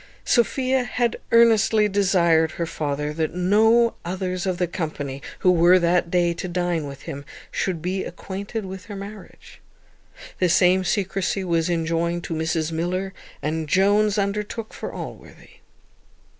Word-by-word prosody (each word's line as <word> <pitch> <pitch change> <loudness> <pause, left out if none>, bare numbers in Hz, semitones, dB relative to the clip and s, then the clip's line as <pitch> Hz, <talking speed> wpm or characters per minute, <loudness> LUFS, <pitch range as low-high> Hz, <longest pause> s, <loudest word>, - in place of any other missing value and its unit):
Sophia 260 +1 +2
had 240 0 -1
earnestly 225 -2 +5
desired 175 -5 +3
her 170 - -2
father 150 -2 -3
that 160 +1 -2
no 220 +6 +4
others 185 +1 -3
of 185 -1 -1
the 180 - +1
company, 150 -5 -5 0.2
who 185 - +5
were 175 +1 +6
that 175 -1 +2
day 175 -1 +2
to 185 - -5
dine 175 -3 -1
with 140 -1 -10
him, 140 +1 -6 0.3
should 175 -4 -2
be 185 +2 -1
acquainted 200 +4 -6
with 190 0 -8
her 205 - -8
marriage. 200 0 -11 0.8
The 180 - +3
same 185 +1 +4
secrecy 195 0 -1
was 170 -2 0
enjoined 170 +1 -1
to - - -4
Mrs 160 0 -1
Miller, 180 +4 -2 0.3
and 155 +1 -2
Jones 205 +4 +3
undertook 210 +2 -2
for - - -6
Allworthy. - - -10
180 Hz, 145 wpm, -23 LUFS, 165-200 Hz, 0.8 s, were